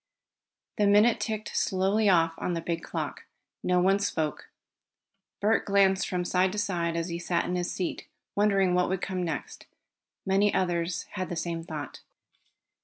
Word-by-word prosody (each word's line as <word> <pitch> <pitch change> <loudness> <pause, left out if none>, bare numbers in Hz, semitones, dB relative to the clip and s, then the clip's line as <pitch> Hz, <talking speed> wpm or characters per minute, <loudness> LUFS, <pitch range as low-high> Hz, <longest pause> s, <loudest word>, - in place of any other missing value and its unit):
The 205 - +4
minute 210 +3 +5
ticked 215 -2 -4
slowly 195 +3 +2
off 165 -3 +4
on 180 - -1
the 165 - -2
big 165 0 -3
clock. - - -5 0.4
No 180 0 +2
one 195 +2 +3
spoke. 160 -6 -2 0.9
Bert 215 +2 +2
glanced 195 -2 +3
from 180 -1 -1
side 185 +1 +2
to - - -5
side 175 -5 -1
as 170 +1 -2
he 170 0 -3
sat 175 0 0
in 180 - -2
his 175 0 -1
seat, 180 - -4 0.3
wondering 195 -3 +3
what 180 0 +2
would 190 -1 -2
come 185 -1 -2
next. 165 -4 -5 0.6
Many 195 +2 +3
others 175 -1 0
had 185 -2 -4
the 175 - -3
same 165 0 -3
thought. 150 -5 -7
185 Hz, 165 wpm, -28 LUFS, 170-200 Hz, 0.9 s, minute